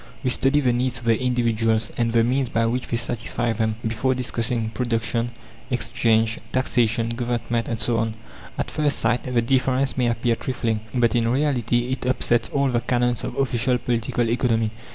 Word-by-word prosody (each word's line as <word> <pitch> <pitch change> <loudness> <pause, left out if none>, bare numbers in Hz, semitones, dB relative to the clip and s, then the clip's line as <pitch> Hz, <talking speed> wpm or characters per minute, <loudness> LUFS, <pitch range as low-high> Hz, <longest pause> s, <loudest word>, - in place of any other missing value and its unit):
We 130 - +2
study 135 +3 +2
the 125 -3 +2
needs 125 +1 0
of 120 - -8
the 115 +1 +2
individuals, 115 -3 +1
and 115 -1 0
the 115 0 +4
means 130 +1 +1
by 115 0 +1
which 125 +2 -1
they 115 - -1
satisfy 120 0 -1
them, 110 0 0
before 115 +4 0
discussing 120 -2 -1
Production, 115 0 -1 0.4
Exchange, 115 -2 +1
Taxation, 115 -3 +1
Government, 120 -1 -2
and 115 -2 -3
so 120 -1 +1
on. 110 -1 -1 0.4
At - - -2
first 150 -2 +1
sight 125 - 0
the 120 -1 +3
difference 130 +2 +1
may 125 -2 +2
appear 120 0 +1
trifling, 115 -2 -2 0.2
but 120 -2 +3
in 115 -2 +2
reality 125 -2 +1
it 130 -1 -2
upsets 120 -2 +1
all 140 -1 +1
the 120 -2 +1
canons 120 -1 0
of - - -4
official 125 -2 +1
Political 120 -1 -1
Economy. 115 -3 +1
120 Hz, 175 wpm, -23 LUFS, 115-125 Hz, 0.4 s, the